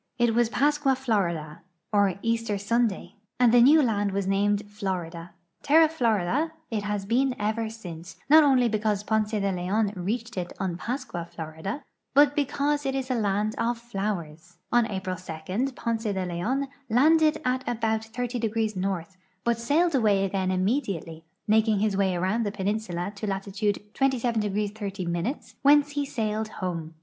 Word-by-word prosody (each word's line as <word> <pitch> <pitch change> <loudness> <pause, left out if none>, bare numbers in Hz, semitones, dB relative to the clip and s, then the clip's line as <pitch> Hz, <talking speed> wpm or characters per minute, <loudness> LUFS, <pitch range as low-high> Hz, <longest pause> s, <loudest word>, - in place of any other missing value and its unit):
It 240 -2 +3
was 235 0 +3
Pascua 290 +1 +2
Florida, 170 -11 -1 0.3
or 200 -3 +3
Easter 230 -2 0
Sunday, 215 0 -1 0.2
and 245 -2 +5
the 245 - +7
new 295 +5 +7
land 205 -4 0
was 200 0 -1
named 200 +1 +1
Florida. 180 -5 -5 0.3
Terra 315 +2 +6
Florida 255 - 0 0.2
it 215 -2 -1
has 205 -1 -3
been 250 +4 +1
ever 220 +2 -1
since, 175 -6 -9
not 310 +2 +8
only 260 -4 +4
be 215 -2 0
cause 210 -1 0
Ponce 215 0 +1
de 200 -3 0
Leon 195 +4 0
reached 225 +5 -3
it 175 -1 -3
on 185 -3 -1
Pascua 185 -4 -4
Florida, 160 - -6 0.3
but 290 0 +6
because 290 +1 0
it 270 -1 -1
is 265 -1 -2
a - - +3
land 210 -2 0
of 235 +1 0
flowers. 175 -7 -5
On 240 -1 +4
Ai>ril 190 -3 -3 0.5
2 - - -5
Ponce 230 -1 -3
de 190 -3 -1
Leon 220 +11 -1 0.2
landed 310 +6 +4
at 255 +1 0
about 220 -2 0
30° 225 -2 -2
N.,but 185 +4 -3
sailed 310 +8 +2
away 210 -6 +3
again 190 -1 -1
immediately, 185 - -1 0.2
making 220 0 +3
his 210 +1 +1
Avay 190 -2 +1
around 190 +6 0
the 205 -3 -1
i)eninsula 200 -2 -2
to 210 +1 -5
latitude 200 +1 -1
27° 225 -6 0
30', 195 - -2 0.2
whence 290 +1 +5
he 285 -1 -2
sailed 220 -3 -2
home. 170 -6 -5
215 Hz, 155 wpm, -26 LUFS, 190-245 Hz, 0.5 s, not